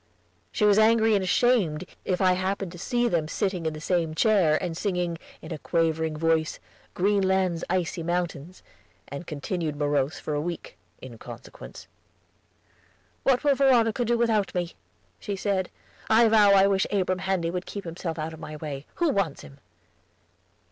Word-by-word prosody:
She 210 - +1
was 205 0 +5
angry 220 0 +4
and 200 -2 +2
ashamed, 185 -5 +2 0.2
if 185 0 -1
I 185 -1 +5
happened 185 0 -2
to 175 - -10
see 240 +5 0
them 170 -8 0
sitting 185 -2 -2
in 160 - -2
the 155 - -7
same 165 -1 -1
chair, 185 -7 +3
and 175 -3 -4
singing, 175 -3 -2 0.2
in - - -9
a 155 - -6
quavering 160 -1 0
voice, 160 0 +1 0.4
"Greenland's 190 -3 +1
Icy 180 -1 -1
Mountains," 175 -1 -3 0.5
and 140 +4 -7
continued 155 +1 -3
morose 145 -1 0
for 155 - -4
a 145 - 0
week, 175 - -6 0.3
in - - -10
consequence. - - -11 1.4
"What 265 0 +2
will 290 -1 +4
Veronica 250 -4 +3
do 235 0 +1
without 220 -5 +1
me?" 175 -1 -2 0.5
she 200 - -4
said. 195 -2 -1 0.4
"I 225 +1 +6
vow 215 -2 +6
I 195 0 +6
wish 195 -1 +2
Abram 185 -2 0
Handy 185 -3 -1
would 180 +1 -4
keep 200 - -6
himself 165 -1 -5
out 160 +1 -4
of 160 - -11
my 155 -1 -7
way; 150 -2 -6
who 340 -2 +1
wants 195 - -1
him?" 140 - -14
180 Hz, 165 wpm, -26 LUFS, 160-205 Hz, 1.4 s, I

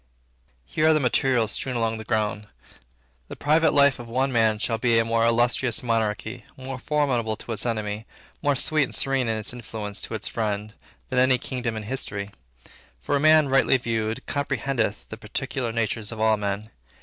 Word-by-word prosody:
Here 155 - +1
are 160 - +5
the - - +3
materials 125 -4 +2
strown 130 +3 -2
along 115 -1 0
the - - -6
ground. 105 -2 -1 0.8
The - - -8
private 155 +3 +3
life 140 -2 +4
of 120 - -8
one 130 +3 0
man 110 -3 +3
shall 115 +1 -1
be 115 -1 +3
a 115 - +3
more 115 0 +1
illustrious 120 +1 +2
monarchy, 115 0 -1
more 130 0 -6
formidable 130 -7 0
to 115 - -9
its 115 +2 -1
enemy, 110 -1 -3 0.3
more 145 -1 +2
sweet 150 +2 +3
and - - -5
serene 135 -2 +1
in 110 -1 0
its 110 +2 -4
influence 110 -4 -6
to - - -4
its 105 - -2
friend, 105 -1 -2 0.4
than 130 - +1
any 130 0 +4
kingdom 125 -2 -4
in 110 - -5
history. 105 -4 -3 0.7
For 145 - -1
a - - +2
man, 155 0 +6
rightly 135 0 +4
viewed, 115 -2 -2
comprehendeth 135 -6 -1
the 110 - -7
particular 120 +2 -3
natures 115 -1 -2
of 110 - -7
all 110 0 +4
men. 105 +1 -3
115 Hz, 185 wpm, -25 LUFS, 110-130 Hz, 0.8 s, man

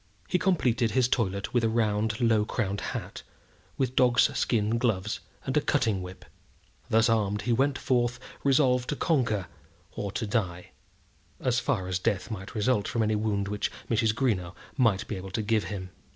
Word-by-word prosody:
He 180 - +1
completed 125 -11 +2
his 130 +1 +2
toilet 100 -6 -1
with 120 -2 +2
a 115 - +3
round, 110 -1 0
low 115 -3 +3
crowned 100 -2 -2
hat, - - -5 0.6
with 130 -1 -1
dog's 125 -1 +4
skin 110 0 +1
gloves, 105 -4 0 0.3
and - - -2
a - - +4
cutting 100 -4 +1
whip. 90 0 -9 0.6
Thus 110 0 +4
armed 105 -2 +1
he 120 - +1
went 135 +3 +2
forth 120 -2 0 0.2
resolved 130 -3 +3
to 150 - 0
conquer 115 - +1 0.5
or 100 - -4
to 115 - -2
die, 95 -5 -2 0.7
as 125 0 +1
far 95 -7 -1
as 90 0 -1
death 105 +1 -1
might 95 +2 -7
result 105 -1 +1
from 115 -3 0
any 110 0 +1
wound 105 -2 0
which 105 0 -2 0.2
Mrs. 110 -1 +2
Greenow 95 -9 0 0.2
might 115 -6 +2
be 105 - -4
able 95 +1 -7
to 110 +3 -2
give 105 -2 +1
him. 95 0 -6
110 Hz, 175 wpm, -28 LUFS, 100-125 Hz, 0.7 s, dog's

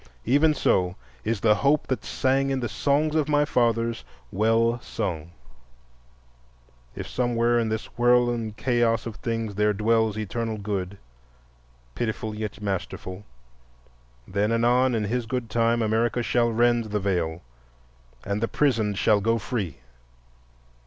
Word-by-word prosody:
Even 145 +5 +4
so 90 -8 +1 0.3
is 110 -2 -1
the 110 -2 +5
hope 140 +6 +2
that 130 -5 -2
sang 135 +1 +1
in 135 -1 0
the 120 - -2
songs 145 +7 +1
of 155 -2 +1
my 145 0 +3
fathers 115 -3 0 0.3
well 115 +4 +2
sung. 85 -9 -4 1.7
If - - -6
somewhere 120 -1 +1
in 115 -1 0
this 110 0 -2
whirl 120 0 +4
and 110 -3 -4
chaos 120 -2 +1
of 115 -3 -6
things 115 -3 -3
there 105 +1 +2
dwells 110 +1 +1
Eternal 110 +1 -3
Good, 100 -2 -4 1.0
pitiful 110 - -3
yet 105 -1 -5
masterful, 95 0 -4 1.0
then 100 +3 0
anon 120 +2 +3
in 110 - 0
His 115 +3 -2
good 120 -1 -3
time 115 0 +2
America 115 +2 +1
shall 120 0 +2
rend 120 0 +2
the 105 -1 -2
Veil 90 -4 -1 0.8
and 100 +2 -2
the 115 - +1
prisoned 110 -9 +1
shall 105 -1 +3
go 115 +3 +2
free. 100 - -3
115 Hz, 140 wpm, -25 LUFS, 105-120 Hz, 1.7 s, the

